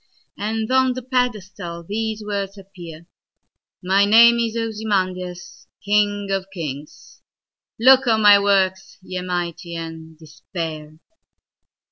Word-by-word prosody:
And 220 Hz, +2 st, -3 dB
on 260 Hz, -1 st, +3 dB
the 255 Hz, 0 st, -7 dB
pedestal 205 Hz, -9 st, -3 dB
these 220 Hz, +3 st, -4 dB
words 200 Hz, -1 st, -4 dB
appear:"My 180 Hz, +1 st, -5 dB
name 235 Hz, +3 st, +6 dB
is 230 Hz, -1 st, -1 dB
Ozymandias, 185 Hz, -6 st, -3 dB, 0.2 s
king 205 Hz, -1 st, +1 dB
of 195 Hz, -1 st, -2 dB
kings:Look 190 Hz, -, -1 dB
on 220 Hz, -2 st, +2 dB
my 205 Hz, -1 st, +8 dB
works, 190 Hz, -2 st, 0 dB
ye 185 Hz, -1 st, -5 dB
mighty, 175 Hz, -1 st, -4 dB
and 160 Hz, -1 st, -8 dB
despair!" 155 Hz, -1 st, -8 dB
195 Hz, 100 wpm, -21 LUFS, 175-220 Hz, 0.2 s, my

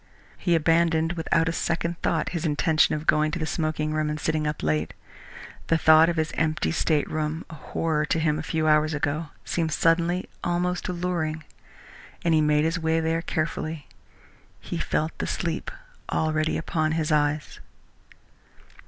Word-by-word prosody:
He 175 Hz, -2 st, +2 dB
abandoned 165 Hz, 0 st, +2 dB
without 165 Hz, -1 st, +1 dB
a -, -, +1 dB
second 170 Hz, 0 st, -1 dB
thought -, -, 0 dB
his 170 Hz, -2 st, -3 dB
intention 155 Hz, 0 st, +2 dB
of 155 Hz, +1 st, -5 dB
going 155 Hz, 0 st, +3 dB
to 155 Hz, -, -3 dB
the 160 Hz, -, -2 dB
smoking 155 Hz, -1 st, -1 dB
room 155 Hz, 0 st, 0 dB
and 150 Hz, 0 st, -3 dB
sitting 155 Hz, 0 st, 0 dB
up 150 Hz, -, -3 dB
late. 75 Hz, 0 st, 0 dB, 0.7 s
The 165 Hz, -, +3 dB
thought 160 Hz, +1 st, +6 dB
of 170 Hz, -, -1 dB
his 155 Hz, -1 st, 0 dB
empty 155 Hz, -, 0 dB
stateroom, 155 Hz, -, -1 dB
a -, -, -8 dB
horror 155 Hz, 0 st, -1 dB
to -, -, +1 dB
him 155 Hz, -1 st, +1 dB
a -, -, -2 dB
few 160 Hz, 0 st, -1 dB
hours 155 Hz, 0 st, +3 dB
ago, 150 Hz, +2 st, -1 dB, 0.2 s
seemed 165 Hz, -2 st, -1 dB
suddenly 170 Hz, +3 st, +2 dB, 0.2 s
almost 180 Hz, +1 st, -1 dB
alluring, 170 Hz, -3 st, -2 dB, 0.8 s
and 165 Hz, -, +3 dB
he 155 Hz, -, +4 dB
made 150 Hz, 0 st, +3 dB
his 165 Hz, +2 st, 0 dB
way 160 Hz, 0 st, +1 dB
there 165 Hz, +1 st, 0 dB
cheerfully. 155 Hz, -2 st, -3 dB, 0.7 s
He -, -, -5 dB
felt 155 Hz, +1 st, -1 dB
the -, -, -2 dB
sleep 165 Hz, -2 st, -2 dB, 0.4 s
already 155 Hz, 0 st, 0 dB
upon 155 Hz, -1 st, -1 dB
his 160 Hz, -1 st, -1 dB
eyes. 150 Hz, 0 st, 0 dB
160 Hz, 160 wpm, -25 LUFS, 155-165 Hz, 0.8 s, thought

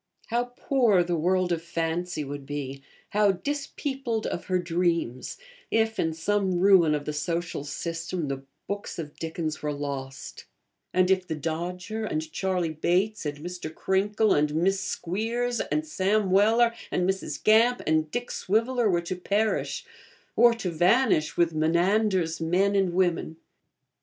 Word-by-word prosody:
How 240 Hz, +1 st, +1 dB
poor 235 Hz, -10 st, +3 dB
the 175 Hz, 0 st, -1 dB
world 180 Hz, +2 st, +1 dB
of 165 Hz, -2 st, 0 dB
fancy 170 Hz, 0 st, -2 dB
would 145 Hz, 0 st, -6 dB
be, 135 Hz, -1 st, -5 dB, 0.3 s
how 205 Hz, -1 st, +3 dB
'dispeopled 270 Hz, 0 st, -3 dB
of -, -, -3 dB
her 185 Hz, -2 st, +1 dB
dreams,' 170 Hz, -7 st, -1 dB, 0.3 s
if, 225 Hz, 0 st, +1 dB
in 160 Hz, -, +1 dB
some 190 Hz, +3 st, 0 dB
ruin 180 Hz, -5 st, +5 dB
of 145 Hz, -1 st, -4 dB
the 150 Hz, -, -3 dB
social 165 Hz, +1 st, -2 dB
system, 165 Hz, +2 st, -4 dB
the 135 Hz, -1 st, -3 dB, 0.2 s
books 200 Hz, 0 st, -5 dB
of 150 Hz, -3 st, -6 dB
Dickens 160 Hz, -1 st, -3 dB
were 150 Hz, -, -1 dB
lost; 140 Hz, -2 st, -6 dB, 0.5 s
and 185 Hz, 0 st, +3 dB
if 185 Hz, -1 st, +2 dB
The 160 Hz, -, -2 dB
Dodger, 180 Hz, +8 st, -4 dB
and 155 Hz, -4 st, -3 dB
Charley 180 Hz, -4 st, -1 dB
Bates, 180 Hz, +4 st, 0 dB
and 145 Hz, 0 st, -4 dB
Mr. 175 Hz, -3 st, -5 dB
Crinkle, 205 Hz, +5 st, +1 dB
and 150 Hz, 0 st, +1 dB
Miss 190 Hz, +4 st, +2 dB
Squeers, 230 Hz, +6 st, -2 dB
and 310 Hz, -, -1 dB
Sam 205 Hz, -8 st, +1 dB
Weller, 225 Hz, +4 st, +4 dB, 0.2 s
and 180 Hz, -, 0 dB
Mrs. 190 Hz, 0 st, -3 dB
Gamp, 230 Hz, +3 st, +4 dB
and 155 Hz, 0 st, +1 dB
Dick 245 Hz, +8 st, -3 dB
Swiveller 230 Hz, +3 st, +1 dB
were 175 Hz, -2 st, +2 dB
to 175 Hz, +2 st, -4 dB
perish, 205 Hz, +4 st, -1 dB, 0.5 s
or 235 Hz, 0 st, +6 dB
to 195 Hz, -6 st, -3 dB
vanish 175 Hz, 0 st, +3 dB
with 170 Hz, -1 st, +3 dB
Menander's 170 Hz, +2 st, +1 dB
men 190 Hz, +5 st, +2 dB
and 190 Hz, -3 st, +1 dB
women! 175 Hz, -3 st, 0 dB
180 Hz, 150 wpm, -27 LUFS, 160-210 Hz, 0.5 s, or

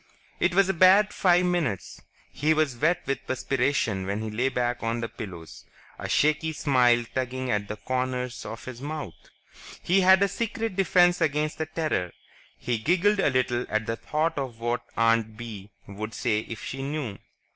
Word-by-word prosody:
It 175 Hz, 0 st, +1 dB
was 195 Hz, -1 st, +5 dB
a 195 Hz, -, +1 dB
bad 190 Hz, +4 st, +5 dB
five 180 Hz, -1 st, +3 dB
minutes; 155 Hz, -, -2 dB, 0.3 s
he 155 Hz, +2 st, +1 dB
was 155 Hz, -5 st, +1 dB
wet 155 Hz, +8 st, +1 dB
with 135 Hz, +1 st, -3 dB
perspiration 130 Hz, -6 st, 0 dB
when 100 Hz, +2 st, -2 dB
he 110 Hz, -, -4 dB
lay 125 Hz, +5 st, 0 dB
back 120 Hz, -1 st, -1 dB
on 115 Hz, +1 st, -1 dB
his 115 Hz, -1 st, -4 dB
pillows, 85 Hz, -6 st, -9 dB, 0.4 s
a -, -, -5 dB
shaky 155 Hz, +2 st, +2 dB
smile 125 Hz, -5 st, +3 dB
tugging 130 Hz, 0 st, -2 dB
at 105 Hz, -1 st, -1 dB
the 105 Hz, -, -4 dB
corners 125 Hz, +1 st, -3 dB
of 115 Hz, +1 st, -8 dB
his 125 Hz, -1 st, -8 dB
mouth. 145 Hz, -, -7 dB, 0.5 s
He 190 Hz, +3 st, +3 dB
had 190 Hz, +1 st, +6 dB
a -, -, +4 dB
secret 225 Hz, -1 st, -3 dB
defense 180 Hz, -2 st, +4 dB
against 150 Hz, 0 st, 0 dB
the 160 Hz, -, -2 dB
Terror. 155 Hz, -, -2 dB, 0.4 s
He 120 Hz, -2 st, -2 dB
giggled 185 Hz, -, +2 dB
a 190 Hz, -, +3 dB
little 125 Hz, -2 st, 0 dB
at 110 Hz, 0 st, 0 dB
the 115 Hz, -, -2 dB
thought 155 Hz, +5 st, -1 dB
of 125 Hz, -4 st, -5 dB
what 120 Hz, +1 st, -1 dB, 0.2 s
Aunt 115 Hz, -1 st, +2 dB
Bee 105 Hz, -4 st, -8 dB, 0.2 s
would 110 Hz, +3 st, -7 dB
say 105 Hz, 0 st, -1 dB
if 115 Hz, -, -7 dB
she 135 Hz, -, -5 dB
knew. 135 Hz, -7 st, -4 dB
130 Hz, 180 wpm, -26 LUFS, 115-160 Hz, 0.5 s, had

